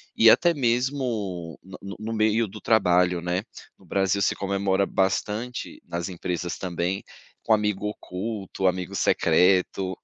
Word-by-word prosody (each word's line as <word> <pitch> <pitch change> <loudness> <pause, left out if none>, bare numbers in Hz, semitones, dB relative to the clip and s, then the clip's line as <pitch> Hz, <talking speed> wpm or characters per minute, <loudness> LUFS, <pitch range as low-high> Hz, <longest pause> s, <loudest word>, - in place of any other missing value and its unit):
e 115 - +7
até 170 +8 +5
mesmo 120 - -1
no 95 0 -11
no 100 0 -7
no 110 +1 -4
meio 110 +1 +2
do 95 - -11
trabalho, 90 -5 +3
né. 90 +2 -1 0.4
No - - -20
Brasil, 100 0 +1
se - - +2
comemora 100 0 0
bastante 105 +6 -2
nas 85 +2 -4
empresas 90 -1 -4
também, 90 +1 -2 0.4
com 110 - +3
amigo 105 -1 0
oculto, 100 -1 -5
amigo 90 -1 -1
secreto, 95 0 +2
95 Hz, 135 wpm, -25 LUFS, 90-110 Hz, 0.4 s, e